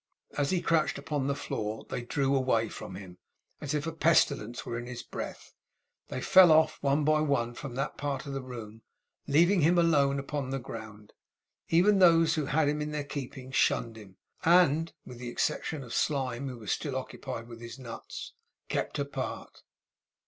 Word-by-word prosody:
As 145 -1 0
he 180 -2 0
crouched 160 -3 +2
upon 140 -1 -2
the 140 - 0
floor, 110 -4 -4
they - - -2
drew 135 +3 0
away 115 -4 +2
from 95 - -8
him 95 -2 -10 0.4
as 145 +1 -3
if 150 +1 -1
a 165 - -2
pestilence 140 -7 +2
were 115 - -4
in 120 +1 -5
his 125 -1 -6
breath. - - -7 0.5
They 130 - -5
fell 185 +2 +7
off, 155 0 +4
one 140 +2 +2
by 155 +1 +3
one, 130 -6 0
from 125 0 -7
that 135 +3 -3
part 140 -1 -2
of 140 - -5
the 135 - -3
room, 115 -4 -9 0.5
leaving 170 +6 +4
him 170 +4 +4
alone 145 -5 +3
upon 140 -1 -3
the 135 - -1
ground. 110 -4 -9 0.6
Even 195 +5 +4
those 165 -3 +6
who 150 -4 -1
had 150 +1 +2
him 150 +1 0
in 150 - -2
their 150 -1 -3
keeping 135 -2 -7
shunned 115 -2 +1
him, 100 -4 -13 0.3
and 165 -2 +4
(with 125 -2 -10
the 125 -1 -5
exception 140 +4 -2
of 120 - -9
Slyme, 135 -2 0
who 125 - -7
was 110 -4 -4
still 140 -3 -2
occupied 130 -2 -5
with 115 -1 -11
his 120 +2 -8
nuts) 120 -4 -8 0.4
kept - - -2
apart. 140 0 -5
140 Hz, 185 wpm, -29 LUFS, 120-155 Hz, 0.6 s, fell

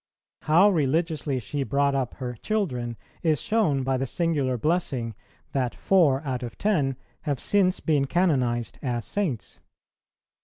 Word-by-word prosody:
How 170 +6 +5
religiously 155 -4 +1
she 140 +6 -4
brought 140 +1 +1
up 135 -3 -1
her 125 -2 -4
children 125 - -2 0.2
is 155 -4 +2
shown 190 -12 +1
by 135 0 +1
the 135 +1 -2
singular 145 -5 0
blessing, 135 -6 -1 0.4
that 130 -3 -1
four 155 -8 +3
out 130 -2 -2
of 120 -2 -7
ten 150 -11 +1 0.3
have 145 -4 -2
since 190 -2 +2
been 145 -3 +1
canonized 130 -9 +1
as 120 -4 -2
Saints. 175 - -3
140 Hz, 140 wpm, -26 LUFS, 125-170 Hz, 0.4 s, How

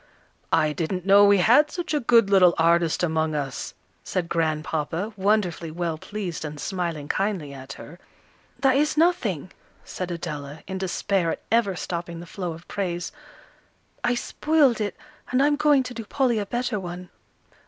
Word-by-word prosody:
"I 150 -1 +3
didn't 175 +4 -3
know 200 +1 +7
we 200 0 +6
had 245 - +5
such 350 -2 -4
a 300 - +2
good 230 -5 +4
little 180 -3 +6
artist 170 +1 +3
among 160 -2 0
us," 140 -3 -4 0.3
said 175 -2 -2
Grandpapa, 160 +4 -1
wonderfully 190 -4 0
well 165 -1 -3
pleased 195 -6 -5
and 150 -1 -6
smiling 170 -5 -3
kindly 190 -8 -1
at 135 0 -9
her. 170 +4 -12 0.6
"That 270 -1 +4
is 300 +1 +1
nothing," 235 - +1 0.3
said 185 -1 -5
Adela, 150 -4 -6
in 190 0 -5
despair 190 -1 0
at - - -9
ever 225 -5 +2
stopping 170 -1 -5
the 170 - -8
flow 175 -1 -5
of 165 +2 -13
praise. 175 -3 -3 0.9
"I 245 0 +2
spoiled 280 -2 +2
it, 205 -3 -2 0.3
and 255 - +1
I'm 290 0 +3
going 290 -2 +4
to 250 - -7
do 230 -1 -6
Polly 240 0 +1
a 205 - -3
better 240 -1 -1
one." 180 0 -7
185 Hz, 165 wpm, -24 LUFS, 165-225 Hz, 0.9 s, know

